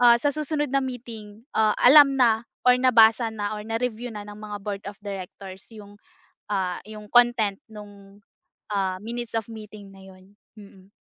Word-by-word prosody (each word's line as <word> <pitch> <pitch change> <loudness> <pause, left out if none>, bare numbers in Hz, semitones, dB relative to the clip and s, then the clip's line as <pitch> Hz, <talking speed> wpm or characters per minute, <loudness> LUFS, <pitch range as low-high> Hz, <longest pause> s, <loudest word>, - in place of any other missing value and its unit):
ah, 240 -1 +7
sa 290 +3 0
susunod 300 -1 -2
na 275 - +2
meeting, 225 -4 -8
ah, 215 -1 +3
alam 275 +1 +7
na 230 -3 +3 0.2
or 250 0 +6
nabasa 230 -2 +5
na 205 -1 -4
or - - -6
na-review 230 +1 -3
na 205 -1 -7
ng 205 0 -10
mga 210 -1 -6
board 200 -1 -5
of 200 - -9
directors 190 -1 -8
yung, 205 -2 -13 0.6
ah, 185 -3 -1
yung 210 -1 -10
content 240 -5 +3
nung, 205 -1 -14 0.5
ah, 190 -2 -1
minutes 235 +1 -6
of 225 - -2
meeting 210 -2 -11
na 195 - -15
'yun, 190 +1 -17 0.2
mm. 195 -2 -16
215 Hz, 170 wpm, -24 LUFS, 200-240 Hz, 0.6 s, ah